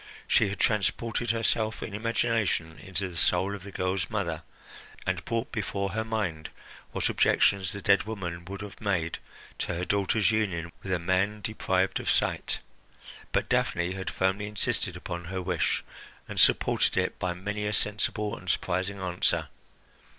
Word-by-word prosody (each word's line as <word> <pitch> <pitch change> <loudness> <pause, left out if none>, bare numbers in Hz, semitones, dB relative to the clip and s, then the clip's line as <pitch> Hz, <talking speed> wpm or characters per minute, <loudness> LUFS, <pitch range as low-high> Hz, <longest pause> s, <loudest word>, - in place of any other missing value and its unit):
She - - +4
had 100 - -5
transported 115 +3 +1
herself 115 -1 +1
in 105 - -6
imagination 110 -7 0
into 95 -1 -2
the 90 - -9
soul 95 +4 +2
of 100 - -6
the 100 +1 -9
girl's 95 -2 -1
mother, 85 -7 -1 0.6
and - - -1
brought 115 -1 -1
before 100 -2 -2
her 110 +3 -1
mind 100 -9 -2 0.4
what - - +1
objections 95 -4 +3
the - - -6
dead - - +4
woman 90 -6 -4
would 95 +2 -6
have 105 +1 -9
made 90 -6 0 0.4
to 90 - -1
her 90 +2 -2
daughter's 100 +2 +2
union 90 -6 0
with 95 - -5
a 95 - +3
man 95 +4 +1
deprived 95 -3 0
of - - -2
sight; - - +1 0.7
but - - +1
Daphne 85 +1 +1
had 95 0 -3
firmly 95 +2 0
insisted 105 -1 0
upon 85 0 -5
her 95 +2 -3
wish, 90 -2 0 0.4
and - - -3
supported - - +4
it - - 0
by 90 -1 -1
many 105 +3 -3
a - - 0
sensible 105 +1 +1
and 90 -3 -8
surprising 95 +2 0
answer. 90 -1 0
100 Hz, 160 wpm, -28 LUFS, 90-105 Hz, 0.7 s, She